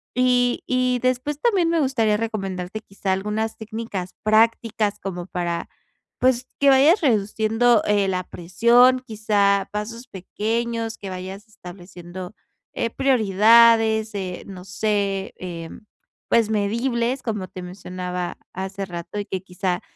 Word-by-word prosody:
y 250 -1 +2
y 255 -1 +1
después 255 +4 -1
también 380 -8 +2
me 335 -1 +2
gustaría 230 -7 +2
recomendarte 195 -3 -4
quizá 195 -2 -4
algunas 210 +3 -2
técnicas 220 -4 -6
prácticas 215 -1 +2
como 180 -3 -5
para, 175 -2 -3 0.5
pues, 255 0 +2
que 280 - +5
vayas 285 +8 +5
reduciendo, 225 -1 +2
eh, 205 -1 +2
la 185 -1 -1
presión, 235 +10 +3
quizá 205 -3 +1
pasos 230 +4 -5
pequeños, 225 +4 -3
que 195 - -7
vayas 190 +3 -7
estableciendo, 180 -2 -10 0.4
eh, 230 - -1
prioridades, 225 -2 +4
eh, 185 -2 -4
no 190 -2 -9
sé, 195 0 -1
em, 175 +3 -8 0.4
pues, 225 -2 +3
medibles, 235 +4 0
como 210 -5 -3
te 185 - -8
mencionaba 180 -1 -5 0.2
hace 190 +1 -4
rato, 175 +3 -6
y 205 - -3
que 190 -1 -4
quizá 180 -1 -2
215 Hz, 125 wpm, -22 LUFS, 190-235 Hz, 0.5 s, que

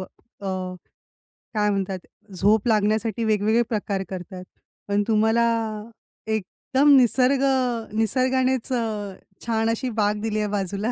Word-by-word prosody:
अ, - - -4 1.5
काय 210 -1 +1
म्हणतात 195 -2 -2 0.4
झोप 210 +3 +3
लागण्यासाठी 215 +1 +1
वेगवेगळे 220 +1 +2
प्रकार 200 -3 -2
करतात. 185 0 -7 0.4
पण 205 0 +1
तुम्हाला 220 +1 +3 0.8
एकदम 260 +7 +2
निसर्ग 260 +2 +3 0.5
निसर्गानेच 255 +3 +1
अ, 215 -4 -2 0.3
छान 225 -1 +1
अशी 240 +3 -1
बाग 210 0 +1
दिली 215 -1 -1
आहे 210 - 0
बाजूला. 200 +2 -2
220 Hz, 110 wpm, -24 LUFS, 205-235 Hz, 1.5 s, झोप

